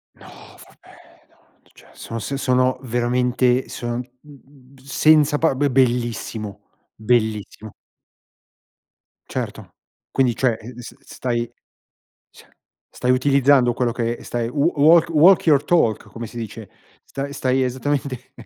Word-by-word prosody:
No, - - -17 0.4
vabbè, - - -20 0.3
no, - - -33
cioè, - - -20
sono 115 - -7
sen 140 +5 -4
sono 130 -1 +1
veramente 125 +1 0
sono, 120 0 -4
mh - - -2 0.2
mh 150 - -17
mhmm, 135 -1 -20
senza 150 +2 +3
pa 160 -1 +2
be 145 +2 +1
bellissimo, 120 -4 -1 0.3
bellissimo. 110 -2 -1 1.6
Certo. - - -6 0.4
Quindi, 130 -3 +1
cioè, 125 -4 +1
uhm, 120 +2 -11
s 120 - -10
stai 120 -3 -4 0.8
cioè, - - -20 0.4
stai 125 - -2
utilizzando 135 -1 +3
quello 120 -1 0
che, 115 0 -2
ehm, - - -18
stai, 120 -1 -3
"w 150 +5 +1
walk 160 +3 +5
walk 170 +4 +5
your 145 -3 +4
talk" 115 -11 +1
come 115 0 -7
si 115 - -13
dice, 110 -2 -8 0.3
sta 140 +1 -6
stai 130 -1 0
esattamente 130 0 -3
125 Hz, 135 wpm, -21 LUFS, 120-140 Hz, 1.6 s, walk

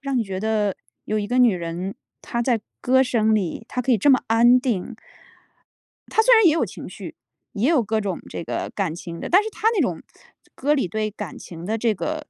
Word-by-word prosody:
让 275 -2 -2
你 - - +2
觉 195 -3 -5
得 210 -2 0 0.3
有 215 0 -1
一 205 - -2
个 250 +3 0
女 240 -6 +5
人， 175 +3 -4 0.3
她 235 0 -3
在 235 -3 +1 0.2
歌 260 +1 +4
声 220 -4 +2
里， 205 +2 -2
她 250 - -2
可 255 - -1
以 235 - +5
这 285 - +4
么 260 - +5
安 240 +3 +5
定。 235 -2 -2 1.1
她 445 - +3
虽 - - +6
然 445 -2 +6
也 310 - +6
有 330 - +1
情 - - -9
绪， - - -9 0.4
也 230 +5 0
有 305 -8 +3
各 220 +1 -1
种 195 -4 -3
这 - - -6
个 - - -4
感 185 -6 -1
情 170 -1 -8
的。 - - -5
但 380 +4 +5
是 440 - -5
她 440 - 0
那 - - +1
种 - - -1 0.5
歌 290 +3 +1
里 270 - 0
对 215 +3 -2
感 205 -4 -7
情 170 -1 -10
的 220 +2 -1
这 225 -1 +1
个， 310 +8 -4
225 Hz, 245 characters per minute, -23 LUFS, 200-260 Hz, 1.1 s, 虽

